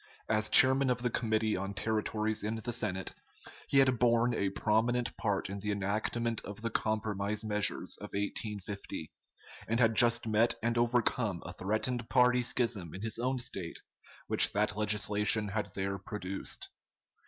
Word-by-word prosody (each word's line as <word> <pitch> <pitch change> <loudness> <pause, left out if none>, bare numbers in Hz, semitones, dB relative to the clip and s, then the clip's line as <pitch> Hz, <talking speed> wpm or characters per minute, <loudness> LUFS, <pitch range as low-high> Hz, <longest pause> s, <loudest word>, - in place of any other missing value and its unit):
As 110 -1 +1
Chairman 130 0 +6
of 125 -1 -1
the 125 - 0
Committee 110 -2 0
on 95 +2 -4
Territories 110 +1 -1
in 110 +2 -2
the 115 +2 -4
Senate, 95 -5 -2 0.5
he 140 - +1
had 130 -3 +4
borne 120 0 +3
a 100 -3 0
prominent 115 +4 0
part 100 -3 -1
in 100 +1 -6
the 105 +1 -3
enactment 110 +3 -1
of 100 +2 -9
the 115 - -2
compromise 105 -1 -1
measures 105 -1 -1
of - - -8
1850, 100 -4 -4 0.6
and 115 +2 0
had 115 -2 +4
just 115 +3 +4
met 110 +2 +3
and 115 0 +1
overcome 120 -5 0
a - - -7
threatened 110 +4 -2
party 125 -1 +4
schism 115 -9 -1
in 95 - -7
his 110 0 -2
own 130 +2 0
State, 95 -8 -4 0.4
which - - +6
that - - 0
legislation 105 0 +2
had 105 0 -3
there 100 0 -2
produced. 95 0 -4
110 Hz, 155 wpm, -31 LUFS, 100-120 Hz, 0.6 s, Chairman